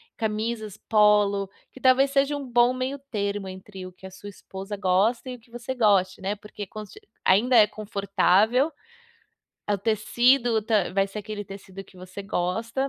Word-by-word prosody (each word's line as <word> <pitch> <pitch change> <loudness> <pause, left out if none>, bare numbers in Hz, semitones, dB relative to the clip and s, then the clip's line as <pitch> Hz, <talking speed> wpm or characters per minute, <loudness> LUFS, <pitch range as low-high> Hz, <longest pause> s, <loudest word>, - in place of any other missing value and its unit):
camisas 220 -1 -3
polo, 210 -2 +3 0.2
que 265 - -14
talvez 270 +1 +4
seja 280 +1 +2
um 275 - -7
bom 240 0 +4
meio 255 +2 -3
termo 200 -3 -2
entre 190 0 -9
o - - -11
que 185 +1 -16
a 190 - -9
sua 205 +2 -10
esposa 195 +1 -8
gosta 200 +6 +1
e 250 - -7
o - - -22
que 230 +1 -26
você 240 +2 -5
goste, 195 -6 +2
né, 195 +2 -2
porque 210 -1 -9
conste 215 - -10 0.3
ainda 240 +7 +4
é 215 - +8
confortável, 210 - +1 1.0
o 205 - +2
tecido 230 +2 +2
tá 210 -5 +1
vai 195 +1 +1
ser 205 +2 -7
aquele 210 0 -6
tecido 195 -1 -10
que 195 0 -20
você 185 +2 -9
gosta, 225 +8 -2
210 Hz, 170 wpm, -25 LUFS, 195-240 Hz, 1.0 s, é